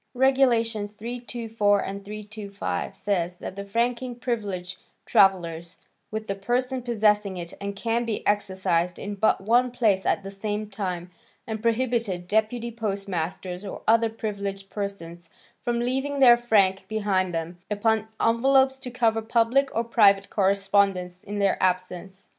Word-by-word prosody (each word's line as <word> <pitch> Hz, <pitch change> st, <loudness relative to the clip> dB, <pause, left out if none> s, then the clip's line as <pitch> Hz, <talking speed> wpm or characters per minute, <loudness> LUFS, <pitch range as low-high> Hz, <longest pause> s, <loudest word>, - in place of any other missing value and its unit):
Regulations 235 Hz, -5 st, +2 dB
324 225 Hz, -3 st, -1 dB
and 200 Hz, +1 st, -6 dB
325 200 Hz, -, -5 dB
says 180 Hz, -3 st, -1 dB
that 185 Hz, -, -7 dB
the 200 Hz, -, -5 dB
franking 235 Hz, +4 st, -1 dB
privilege 200 Hz, -7 st, -4 dB, 0.3 s
travels 170 Hz, -3 st, +2 dB, 0.3 s
with 220 Hz, 0 st, -4 dB
the 195 Hz, -, -2 dB
person 250 Hz, +6 st, -1 dB
possessing 210 Hz, -4 st, +1 dB
it 170 Hz, -1 st, -7 dB
and 200 Hz, 0 st, -4 dB
can 230 Hz, +3 st, 0 dB
be 230 Hz, -3 st, -3 dB
exercised 185 Hz, -4 st, 0 dB
in 205 Hz, -, -5 dB
but 205 Hz, 0 st, +2 dB
one 240 Hz, +5 st, +3 dB
place 220 Hz, -6 st, +1 dB
at -, -, 0 dB
the 195 Hz, -, -7 dB
same 210 Hz, +1 st, -3 dB
time, 185 Hz, -4 st, -4 dB, 0.3 s
and 220 Hz, -1 st, -4 dB
prohibited 230 Hz, -6 st, 0 dB
deputy 220 Hz, +3 st, 0 dB
postmasters 195 Hz, -4 st, -4 dB
or 195 Hz, -, -7 dB
other 230 Hz, +1 st, +4 dB
privileged 200 Hz, -3 st, -5 dB
persons 175 Hz, -5 st, -6 dB, 0.3 s
from 240 Hz, -1 st, -1 dB
leaving 265 Hz, +4 st, -1 dB
their 250 Hz, -3 st, +8 dB
frank 205 Hz, -5 st, +2 dB
behind 200 Hz, -4 st, 0 dB
them 165 Hz, +1 st, -4 dB
upon 220 Hz, +1 st, +1 dB
envelopes 265 Hz, +3 st, +3 dB
to 260 Hz, -, -7 dB
cover 230 Hz, -2 st, +1 dB
public 235 Hz, +4 st, +2 dB
or 230 Hz, -, +1 dB
private 205 Hz, -5 st, +4 dB
correspondence 195 Hz, -2 st, +1 dB
in 205 Hz, +1 st, -5 dB
their 200 Hz, -1 st, +1 dB
absence. 185 Hz, +1 st, -2 dB
205 Hz, 140 wpm, -25 LUFS, 195-235 Hz, 0.3 s, their